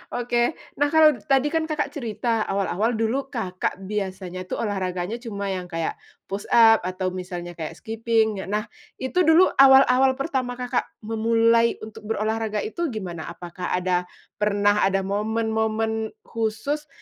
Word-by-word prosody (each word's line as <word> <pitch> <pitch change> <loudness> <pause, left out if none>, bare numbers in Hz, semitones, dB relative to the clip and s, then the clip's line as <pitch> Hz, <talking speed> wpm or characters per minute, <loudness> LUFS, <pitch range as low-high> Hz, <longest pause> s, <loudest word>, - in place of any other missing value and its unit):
Oke, 240 +3 +1 0.2
nah 290 - +4
kalau 315 +1 +6 0.2
tadi 275 +1 +3
kan 320 -1 0
Kakak 300 -3 -2
cerita 230 -4 -2
awal-awal 200 +4 0
dulu 225 +5 -1
Kakak 195 -6 -3
biasanya 190 -2 -4
tuh - - -3
olahraganya 190 0 -2
cuma 200 -5 -4
yang 185 -1 -4
kayak 165 -2 -3 0.2
push-up 225 +3 +4
atau 185 0 -2
misalnya 180 -1 -6
kayak 160 -2 -6
skipping. 220 -2 0
Nah 210 +2 -1 0.3
itu 320 +6 0
dulu 330 +3 +6
awal-awal 265 -1 +7
pertama 260 -3 -2
Kakak 250 0 -2 0.2
memulai 230 +1 +3
untuk 215 -1 -10
berolahraga 220 -1 -1
itu 340 +10 -2
gimana, 185 - -5
apakah 175 +2 -5
ada 180 0 0 0.3
pernah 205 -1 +3
ada 195 0 0
momen-momen 220 +2 -1
khusus 230 +7 -3
220 Hz, 135 wpm, -24 LUFS, 195-245 Hz, 0.3 s, awal-awal